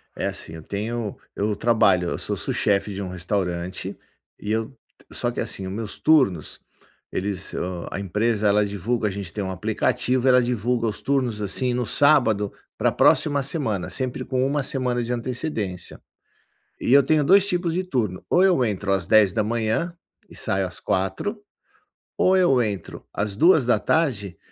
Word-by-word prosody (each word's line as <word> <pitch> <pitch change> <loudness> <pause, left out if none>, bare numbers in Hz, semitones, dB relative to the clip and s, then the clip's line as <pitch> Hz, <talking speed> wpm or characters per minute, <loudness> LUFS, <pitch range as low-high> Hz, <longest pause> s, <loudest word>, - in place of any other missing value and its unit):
É, - - -3
assim, 80 - -6
eu 80 - -9
tenho 110 +2 -4 0.2
eu 105 +1 -1
trabalho, 100 -6 +3
eu - - -2
sou - - -3
sous - - -3
chef 100 0 +1
de 100 - -5
um 95 - -4
restaurante 90 -1 -3 0.4
e 105 - -4
eu 110 +4 -2 0.4
só - - -2
que, - - -6
assim, 95 - -4
os - - -5
meus 110 0 -6
turnos, 130 - +2 0.5
eles 95 -1 -3
hã, 90 -1 -4
a - - -4
empresa 105 +3 0
ela 105 +1 +3
divulga 105 +3 -1
a 100 - -1
gente 95 -3 -6
tem 105 - -4
um 95 - -3
aplicativo, 125 +7 0
ela 125 0 +6
divulga 120 0 0
os 105 - -4
turnos, 130 -6 0
assim, 125 +5 0
no 125 0 -1
sábado 110 -6 +3 0.3
pra - - +2
próxima 145 -2 +3
semana, 130 - -2
sempre 130 -2 -3
com 130 -1 0
1 140 +1 0
semana 125 -2 -1
de 120 - -4
antecedência. 120 - -4 0.8
E 125 - 0
eu 140 0 +8
tenho 155 +3 +2
2 195 +4 +5
tipos 175 -3 0
de 185 +1 -1
turno, 110 - -2
ou 180 - +4
eu 175 -10 +4
entro 100 -2 -1
às 95 -3 0
10h 110 - +2 0.3
e - - -15
saio 95 0 0
às 90 - -7
16h, 95 - -2 0.8
ou 185 - +4
eu 135 -9 +4
entro 105 -4 -4
às 100 -1 -2
14h 125 - +2
110 Hz, 170 wpm, -23 LUFS, 100-130 Hz, 0.8 s, eu